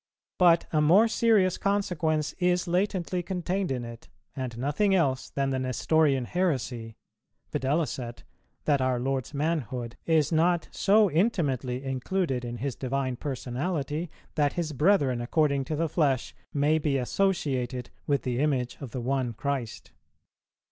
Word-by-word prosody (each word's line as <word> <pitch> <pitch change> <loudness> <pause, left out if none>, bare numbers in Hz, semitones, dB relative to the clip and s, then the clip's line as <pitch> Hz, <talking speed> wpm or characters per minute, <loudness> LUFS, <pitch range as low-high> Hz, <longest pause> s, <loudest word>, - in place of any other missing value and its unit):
But 170 -2 +5
a 155 - +3
more 185 +9 +6
serious 220 -5 +3
consequence 170 -7 0
is 180 0 +1
latently 180 0 0
contained 185 0 -2
in 125 -2 -2
it, 115 -1 -10 0.3
and 130 -4 -4
nothing 150 - +1
else 135 -7 +1
than 135 -1 -1
the 130 - 0
Nestorian 135 +1 +2
heresy, 125 -10 -2 0.6
viz. 145 +3 0 0.7
that 145 -3 +3
our 130 -1 +1
Lord's 135 +2 -2
manhood 130 -6 -2
is 160 -2 +3
not 170 +2 +2
so 205 -1 +4
intimately 140 - 0
included 135 +1 -1
in 120 0 -5
His 135 +2 -3
Divine 130 -1 -2
Personality 145 +5 -3 0.2
that 145 -1 +1
His 165 -3 -2
brethren 140 -5 +3
according 140 +2 +1
to 155 - -2
the 165 +2 0
flesh 145 -5 0 0.2
may 150 +2 +2
be 145 -3 +1
associated 130 -5 -1 0.2
with 140 -1 +1
the 125 -1 -1
Image 135 -4 0
of 135 - -6
the 125 +2 -5
One 130 -1 -1
Christ. 130 -1 -4
145 Hz, 140 wpm, -27 LUFS, 130-170 Hz, 0.7 s, more